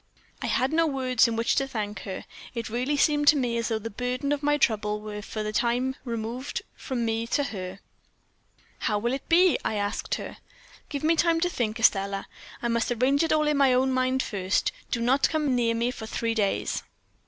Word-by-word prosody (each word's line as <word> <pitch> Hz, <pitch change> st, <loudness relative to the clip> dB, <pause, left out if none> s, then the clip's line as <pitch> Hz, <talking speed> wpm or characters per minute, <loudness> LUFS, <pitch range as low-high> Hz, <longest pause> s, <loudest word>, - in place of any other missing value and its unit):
"I -, -, -2 dB
had 265 Hz, +4 st, +1 dB
no 330 Hz, 0 st, +3 dB
words 255 Hz, -4 st, +2 dB
in 230 Hz, -, -2 dB
which 230 Hz, +1 st, +1 dB
to 270 Hz, -, +2 dB
thank 210 Hz, -5 st, -4 dB
her; 190 Hz, -1 st, -6 dB, 0.3 s
it 230 Hz, -2 st, -4 dB
really 255 Hz, +5 st, 0 dB
seemed 295 Hz, 0 st, +3 dB
to 300 Hz, -, +8 dB
me 245 Hz, -4 st, 0 dB
as 230 Hz, 0 st, -1 dB
though 225 Hz, -, 0 dB
the 225 Hz, +1 st, -6 dB
burden 250 Hz, +5 st, -2 dB
of 290 Hz, -1 st, 0 dB
my 295 Hz, 0 st, +2 dB
trouble 210 Hz, -5 st, +1 dB
were 210 Hz, -1 st, -6 dB
for 215 Hz, +1 st, -5 dB
the 215 Hz, 0 st, -3 dB
time 245 Hz, +3 st, +1 dB
removed 235 Hz, +2 st, -4 dB
from 245 Hz, -3 st, -3 dB
me 225 Hz, 0 st, -1 dB
to 285 Hz, -, +1 dB
her. 190 Hz, -7 st, -5 dB, 1.0 s
"'How 210 Hz, -, 0 dB
will 235 Hz, +4 st, -1 dB
it 270 Hz, -, -5 dB
be?' 355 Hz, +1 st, +5 dB
I 220 Hz, -, -1 dB
asked 205 Hz, 0 st, -1 dB
her. -, -, -7 dB, 0.5 s
"'Give 285 Hz, -1 st, -4 dB
me 325 Hz, +2 st, +4 dB
time 330 Hz, 0 st, +3 dB
to 355 Hz, -, +2 dB
think, 225 Hz, -6 st, -2 dB
Estelle; 195 Hz, -2 st, +2 dB, 0.4 s
I -, -, +1 dB
must 235 Hz, +1 st, 0 dB
arrange 255 Hz, +4 st, +2 dB
it 325 Hz, -, 0 dB
all 305 Hz, -1 st, +3 dB
in 300 Hz, -1 st, +2 dB
my 275 Hz, -2 st, +5 dB
own 260 Hz, +1 st, +2 dB
mind 255 Hz, 0 st, +1 dB
first. 190 Hz, -2 st, 0 dB, 0.2 s
Do 235 Hz, -, -1 dB
not 260 Hz, +4 st, +3 dB
come 305 Hz, -4 st, +1 dB
near 230 Hz, -2 st, +2 dB
me 235 Hz, +2 st, 0 dB
for 220 Hz, -3 st, -8 dB
three 230 Hz, 0 st, -1 dB
days.' 205 Hz, -3 st, 0 dB
240 Hz, 210 wpm, -26 LUFS, 220-275 Hz, 1.0 s, to